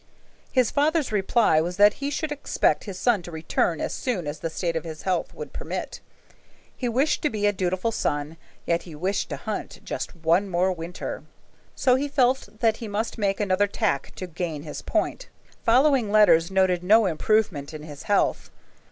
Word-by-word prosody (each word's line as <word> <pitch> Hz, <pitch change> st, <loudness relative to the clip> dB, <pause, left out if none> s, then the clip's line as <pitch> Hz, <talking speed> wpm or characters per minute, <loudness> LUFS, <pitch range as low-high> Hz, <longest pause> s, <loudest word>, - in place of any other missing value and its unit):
His 255 Hz, -4 st, +2 dB
father's 300 Hz, -1 st, +1 dB
reply 200 Hz, -5 st, +3 dB
was 175 Hz, +3 st, -3 dB
that 205 Hz, +1 st, +7 dB
he 280 Hz, -, -1 dB
should 300 Hz, +1 st, -3 dB
expect 295 Hz, -, 0 dB
his 195 Hz, -4 st, -6 dB
son 235 Hz, -4 st, +2 dB
to 175 Hz, -, -10 dB
return 160 Hz, 0 st, -1 dB
as -, -, -2 dB
soon 220 Hz, -, -2 dB
as 145 Hz, +1 st, -5 dB
the 165 Hz, -, -3 dB
state 170 Hz, +1 st, -2 dB
of 165 Hz, -, -2 dB
his 160 Hz, -2 st, -8 dB
health 185 Hz, -3 st, -1 dB
would 465 Hz, -, -8 dB
permit. -, -, -5 dB, 0.8 s
He 245 Hz, -, -2 dB
wished 265 Hz, +6 st, +1 dB
to 300 Hz, -, +1 dB
be 210 Hz, -3 st, -2 dB
a 205 Hz, -, +3 dB
dutiful 185 Hz, +3 st, -1 dB
son, 145 Hz, -5 st, -2 dB, 0.3 s
yet 170 Hz, 0 st, +1 dB
he 165 Hz, -4 st, -11 dB
wished 185 Hz, +6 st, -1 dB
to -, -, -3 dB
hunt -, -, -5 dB
just -, -, -5 dB
one 170 Hz, +4 st, +2 dB
more 180 Hz, +1 st, +2 dB
winter. 170 Hz, 0 st, -5 dB, 0.5 s
So 255 Hz, -, +3 dB
he 285 Hz, +2 st, -1 dB
felt 265 Hz, -5 st, +1 dB
that 225 Hz, -2 st, +3 dB
he 230 Hz, -, -6 dB
must 215 Hz, +3 st, -3 dB
make 195 Hz, -2 st, 0 dB
another 205 Hz, 0 st, +2 dB
tack 140 Hz, -7 st, -1 dB
to 185 Hz, -, -5 dB
gain 165 Hz, -3 st, -4 dB
his 155 Hz, -, -7 dB
point. -, -, -2 dB, 0.4 s
Following 250 Hz, -2 st, +4 dB
letters 205 Hz, -6 st, +5 dB
noted 190 Hz, -2 st, +2 dB
no 215 Hz, +4 st, +5 dB
improvement 180 Hz, -4 st, 0 dB
in 155 Hz, -1 st, -8 dB
his 145 Hz, -2 st, -9 dB
health. 205 Hz, -, +1 dB
195 Hz, 185 wpm, -25 LUFS, 170-230 Hz, 0.8 s, that